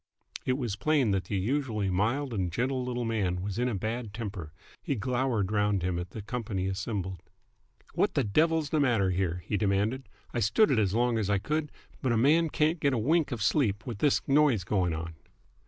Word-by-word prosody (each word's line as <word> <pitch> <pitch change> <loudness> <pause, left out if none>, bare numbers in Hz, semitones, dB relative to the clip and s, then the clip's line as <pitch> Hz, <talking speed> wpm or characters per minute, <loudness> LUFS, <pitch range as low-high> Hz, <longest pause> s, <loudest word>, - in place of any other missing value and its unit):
It 130 - +3
was 120 -7 -2
plain 135 -1 +2
that 95 -1 0
the 100 - -2
usually 110 -2 -1
mild 120 +8 0
and 95 -5 -1
gentle 130 +6 -1
little 125 -1 -2
man 95 -6 -1
was 100 +2 -3
in 125 +1 +1
a 115 - -2
bad 110 +1 -4
temper. 100 -9 -5 0.3
He 140 - -2
glowered 120 -3 0
round 105 -3 +1
him 90 -1 -1
at 90 0 -5
the 105 +2 -8
company 105 -5 -3
assembled. 95 -2 -3 0.7
"What - - +1
the - - +3
devil's 155 +7 +2
the 155 - +2
matter 115 -9 +2
here?" 90 -2 -1
he 105 - -1
demanded. 105 +6 0 0.2
"I 120 - 0
stood 115 - +3
it 120 - +3
as 100 -1 +1
long 120 -1 +2
as 105 -2 -1
I 100 - +3
could, 150 +8 -2 0.3
but 130 - +1
a 115 - +2
man 155 +7 +4
can't 155 +3 +1
get 140 -2 +2
a - - +1
wink 150 +6 +2
of 115 -5 -2
sleep 110 -5 +1
with 115 -5 -5
this 145 - +2
noise 140 -8 +4
going 90 -3 0
on!" 80 +1 -5
110 Hz, 205 wpm, -29 LUFS, 95-130 Hz, 0.7 s, man